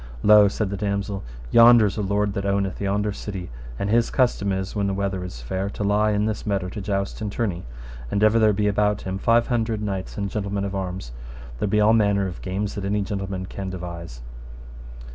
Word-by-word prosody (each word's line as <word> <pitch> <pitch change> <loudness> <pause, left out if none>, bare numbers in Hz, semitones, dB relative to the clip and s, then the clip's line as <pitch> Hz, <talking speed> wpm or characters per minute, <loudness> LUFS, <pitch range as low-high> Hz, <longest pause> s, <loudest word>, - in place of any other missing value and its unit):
Lo, 105 -1 +7
said 100 0 -2
the 100 - -3
damosel, 100 0 -2 0.3
yonder 115 -1 +8
is 100 - -1
a 110 - -2
lord 100 +1 0
that 100 - -3
owneth 100 -1 -1
yonder 100 +1 0
city, 95 - -6 0.3
and 100 - -2
his 115 0 +3
custom 120 -6 +1
is, 95 +1 -3
when 100 -1 0
the 100 - -1
weather 100 -2 -2
is - - -8
fair, 95 +11 -2
to 105 - -5
lie 105 +1 +2
in 105 0 +1
this 110 -1 -2
meadow 100 -3 -1
to 105 +2 -6
joust 100 +1 -2
and 105 -2 -3
tourney. 95 - -2 0.4
And 100 - 0
ever 110 +1 +5
there 110 -1 +5
be 105 +1 0
about 105 0 +1
him 95 0 -4
five 115 +3 +3
hundred 115 -3 0
knights 100 -3 -4
and 100 -1 -1
gentlemen 100 -1 -2
of 100 - -4
arms, 90 -9 -4 0.3
and - - -13
there - - 0
be 105 +2 +2
all 105 +1 +5
manner 100 -3 +3
of 90 -2 -6
games 95 +2 -3
that 100 - -5
any 100 +1 0
gentleman 95 -1 -4
can 95 +1 -6
devise. 85 -8 -7
100 Hz, 220 wpm, -23 LUFS, 95-105 Hz, 0.4 s, yonder